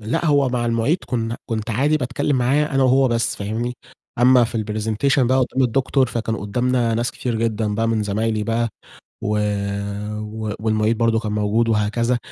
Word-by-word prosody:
لأ، 110 +9 -2
هو 145 -3 +3
مع 120 -1 -1
المعيد 115 +9 +1
كنا 115 -1 -2
كنت 110 0 -3
عادي 140 +7 +2
باتكلم 130 +1 -1
معاه 135 +5 +2
أنا 135 -3 0
وهو 130 +1 +4
بس، 115 -1 0
فاهمني؟ 110 +4 -3 0.4
أمّا 125 0 +6
في 115 0 -3
الpresentation 110 +6 0
بقى 130 +1 +3
قدّام 130 +1 +1
الدكتور، 130 +2 +2
فكان 115 -1 -2
قدّامنا 120 +3 0
ناس 120 +2 0
كتير 120 -1 -4
جدًا 110 -2 -1
بقى 115 +2 0
من 110 -1 +1
زمايلي 110 +1 -1
بقى 115 +1 0 0.5
و - - -2 0.9
و 110 0 -5
والمعيد 110 0 +1
برضه 115 -1 +2
كان 110 -2 -4
موجود 105 +2 +1
وهكذا، 115 +3 +1
115 Hz, 170 wpm, -21 LUFS, 110-125 Hz, 0.9 s, أمّا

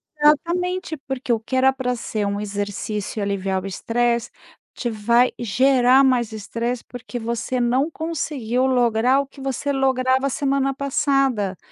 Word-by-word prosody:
Exatamente. 340 +3 +1
Porque 260 -2 -3
o 225 - 0
que 230 +4 -5
era 265 +1 +5
pra 250 -2 -2
ser 215 -2 -3
um 200 0 -2
exercício 205 +1 -4
e - - -1
aliviar 195 -1 -1
o - - -4
estresse, 235 +4 0 0.4
te 240 - -3
vai 235 +3 +3
gerar 255 +3 +4
mais 245 -4 +2
estresse, 230 +3 -4
porque 245 0 -7
você 235 +2 -2
não 255 +6 +1
conseguiu 285 -7 -2
lograr 245 0 +3
o 280 - -2
que 275 - -14
você 270 +1 -2
lograva 260 0 +2
a - - 0
semana 275 -1 0
passada. 270 - 0
250 Hz, 155 wpm, -22 LUFS, 225-270 Hz, 0.4 s, era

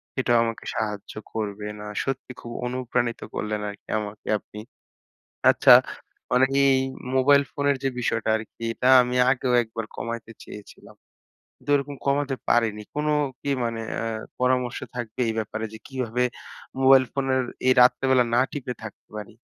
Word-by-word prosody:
সেটাও 120 -2 +2
আমাকে 115 -1 -4
সাহায্য 105 -2 -3 0.2
করবে। 105 -1 -4
না 105 - -8 0.2
সত্যি 135 -1 -4
খুব 120 - -8
অনুপ্রাণিত 125 -1 -1 0.2
করলেন 105 0 -2
আরকি 100 - -12
আমাকে 105 0 -8
আপনি। 105 - -12 0.9
আচ্ছা - - +7 0.6
মানে 130 +1 +5 0.3
এই - - 0 0.3
মোবাইল 140 +2 +5
ফোনের 140 -1 +1
যে - - +3
বিষয়টা 120 - -1
আরকি 110 +1 -10
এটা 125 - 0
আমি 125 0 -2
আগেও 130 -1 0
একবার 110 -1 -6
কমাইতে 115 -1 -5
চেয়েছিলাম। 105 -1 -13 0.6
কিন্তু - - -7
ওইরকম 140 0 -1
কমাতে 140 -1 +1
পারিনি। 110 -3 +2
কোন 150 +1 -1 0.4
কি 140 - -2
মানে 115 -1 -2
অ্যা - - -3 0.4
পরামর্শ 125 -1 +1 0.2
থাকবে 120 0 -5
এই 110 - +1
ব্যাপারে? 110 0 -3
যে 110 - -9
কিভাবে 125 -2 -1 0.6
মোবাইল 135 0 +7
ফোনের 135 -1 0 0.2
এই 130 - +7
রাত্রেবেলা 130 0 +4
না 120 - +5
টিপে 125 -4 -4
থাকতে 110 - -11
পারি? 105 0 -8
125 Hz, 150 wpm, -25 LUFS, 110-130 Hz, 0.9 s, আচ্ছা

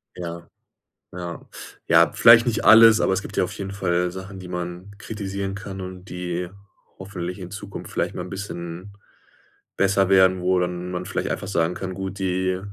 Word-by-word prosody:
Ja. 85 -1 -7 0.6
Ja. 85 -1 -6 0.5
Ja, - - +5
vielleicht 115 0 +7
nicht 115 -3 -1
alles, 115 0 +8
aber - - +2
es 95 - 0
gibt - - -9
ja - - +4
auf 90 +3 -4
jeden 100 -1 -5
Fall 90 -2 0
Sachen, 95 +1 -8
die 90 - -9
man 90 +2 -6
kritisieren 100 -2 -5
kann 95 -1 -7
und 90 0 -8
die 90 -1 -4 0.5
hoffentlich 90 -1 -6
in 90 -2 -8
Zukunft 100 -1 -8
vielleicht - - -1
mal - - -5
'n - - -10
bisschen 90 0 -7 0.8
besser 100 0 +2
werden, 95 -1 +5
wo 90 0 +2
dann 90 0 -3
man 90 0 -4
vielleicht 95 - -3
einfach - - -3
sagen 85 -3 0
kann, 95 0 -5
gut, 95 +1 -6
die 95 0 0
95 Hz, 180 wpm, -23 LUFS, 90-100 Hz, 0.8 s, alles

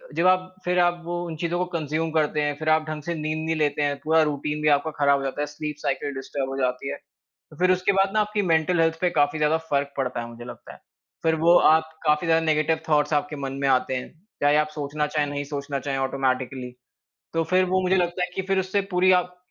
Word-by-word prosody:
जब 175 - +3
आप 185 0 +2
फिर 180 0 +1
आप 175 0 +2
वो 175 0 -3
उन 165 -2 -5
चीज़ों 170 +2 -2
को 180 - +1
कंज़्यूम 160 +1 -2
करते 155 -1 +1
हैं, 145 0 0
फिर 155 0 -1
आप 155 0 +3
ढंग 155 -1 -5
से 170 - -3
नींद 155 0 -3
नहीं 160 0 0
लेते 150 -1 0
हैं, 145 -1 0
पूरा 160 +1 +4
रूटीन 150 +1 -3
भी 150 - +1
आपका 155 +3 -5
ख़राब 140 -1 +4
हो - - -5
जाता 135 +2 -3
है, - - 0
स्लीप 150 0 -5
साइकिल 145 -1 -2
डिस्टर्ब 135 0 -4
हो 135 - -4
जाती 125 +2 -1
है। - - -3 0.5
तो 155 - -16
फिर 185 +1 +4
उसके 185 +2 +2
बाद 195 0 +2
ना 215 - +2
आपकी 210 0 0
मेंटल 165 +2 +2
हेल्थ 165 0 +1
पे 180 - +3
काफ़ी 150 -2 +1
ज़्यादा 150 +1 +3
फ़र्क 140 0 0
पड़ता 130 -3 -2
है, 120 - -5
मुझे 120 0 -10
लगता 120 - -10
है। - - -16 0.4
फिर 160 0 +3
वो 165 +2 +4
आप 160 0 +3 0.2
काफ़ी 150 +2 +2
ज़्यादा 165 0 +3
नेगेटिव 155 +1 +1
थॉट्स 150 0 +2
आपके 145 +1 0
मन 135 -2 -4
में 140 - +1
आते 130 0 +2
हैं, 125 - -5 0.3
चाहे 145 +1 +4
आप 150 0 +2
सोचना 150 0 -2
चाहें 150 0 0
या - - -5
नहीं 145 0 -2
सोचना 140 -1 -4
चाहें 135 +1 -3
ऑटोमैटिकली। 130 -1 -2 0.6
तो 165 - +2
फिर 185 +3 +2
वो 185 +1 +1
मुझे 185 +1 +2
लगता 180 0 0
है - - -7
कि 190 - -2
फिर 195 0 +2
उससे 190 +2 0
पूरी 180 +1 +4
आप 180 0 +1
155 Hz, 250 wpm, -24 LUFS, 145-175 Hz, 0.6 s, पूरा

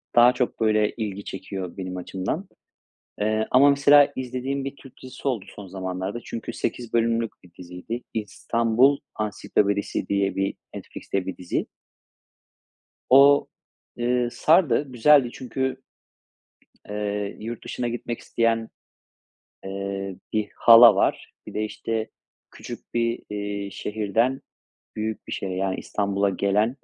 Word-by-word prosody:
daha 120 +1 +7
çok, 125 -1 -2
böyle, 110 -1 +3
ilgi 100 -3 -4
çekiyor 95 -1 -6
benim 90 -1 -5
açımdan. 95 - -4 0.7
Eee, 110 +1 +1
ama 140 +3 +7
mesela 140 0 +6
izlediğim 130 +2 -3
bir 135 +1 -5
Türk 135 - -14
dizisi 130 +2 -5
oldu 115 -7 -2
son 100 - -8
zamanlarda. 95 +3 -4
Çünkü 115 +1 -6
8 120 0 -4
bölümlük 115 -1 +1
bir 90 - -18
diziydi. 90 +7 -6
"İstanbul 115 +5 +2 0.2
Ansiklopedisi" 100 -1 -1
diye 100 -1 0
bir 95 0 0 0.2
Netflix'te 95 -2 -5
bir 95 - -4
dizi. 90 -1 -2 1.4
O, 140 +2 +7 0.5
eee, 120 0 +1
sardı, 155 -5 +3
güzeldi 130 +1 +5
çünkü, 130 +1 -3 1.1
eee, 105 -1 -3
yurt 115 +1 -6
dışına 120 -1 -3
gitmek 120 0 -4
isteyen, 115 -1 0 1.0
eee, 95 0 -4 0.2
bir 105 -2 0
hala 115 -2 +9
var. - - 0
Bir - - -8
de, 110 - -1
işte, 110 +1 -3 0.4
küçük - - -10
bir, 115 0 0
iii, 100 -1 -4
şehirden 110 +7 -1 0.5
büyük 110 0 -4
bir - - -8
şehre, 95 -1 -3
yani 95 0 -1
İstanbul'a 100 -1 0
gelen 100 +3 +1
110 Hz, 125 wpm, -24 LUFS, 100-125 Hz, 1.4 s, hala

